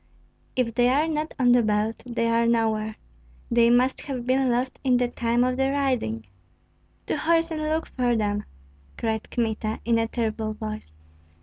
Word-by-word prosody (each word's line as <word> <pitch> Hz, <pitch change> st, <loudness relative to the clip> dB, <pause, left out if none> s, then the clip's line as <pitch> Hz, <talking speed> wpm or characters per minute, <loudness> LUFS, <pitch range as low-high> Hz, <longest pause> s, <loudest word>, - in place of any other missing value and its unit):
"If 245 Hz, -3 st, 0 dB
they 245 Hz, +1 st, +3 dB
are 290 Hz, +5 st, +2 dB
not 310 Hz, 0 st, -2 dB
on 245 Hz, -2 st, +4 dB
the 245 Hz, 0 st, +6 dB
belt, 215 Hz, 0 st, 0 dB
they 230 Hz, -1 st, 0 dB
are 230 Hz, 0 st, +2 dB
nowhere. 220 Hz, -2 st, +1 dB, 0.6 s
They 235 Hz, 0 st, +5 dB
must 250 Hz, +2 st, +3 dB
have 255 Hz, -4 st, -4 dB
been 260 Hz, +1 st, +2 dB
lost 250 Hz, +2 st, -1 dB
in 255 Hz, -2 st, +3 dB
the 245 Hz, 0 st, +1 dB
time 240 Hz, 0 st, 0 dB
of 255 Hz, 0 st, 0 dB
the 270 Hz, 0 st, +2 dB
riding." 255 Hz, -, -1 dB, 0.8 s
"To -, -, -1 dB
horse 330 Hz, +1 st, +2 dB
and 310 Hz, -1 st, -3 dB
look 310 Hz, +1 st, -1 dB
for 245 Hz, -2 st, 0 dB
them!" 205 Hz, -1 st, -1 dB, 0.5 s
cried 220 Hz, -1 st, -2 dB
Kmita, 220 Hz, -2 st, -2 dB
in 230 Hz, 0 st, +3 dB
a 225 Hz, -, +1 dB
terrible 220 Hz, -2 st, -2 dB
voice. 215 Hz, -, -7 dB
240 Hz, 175 wpm, -25 LUFS, 220-260 Hz, 0.8 s, the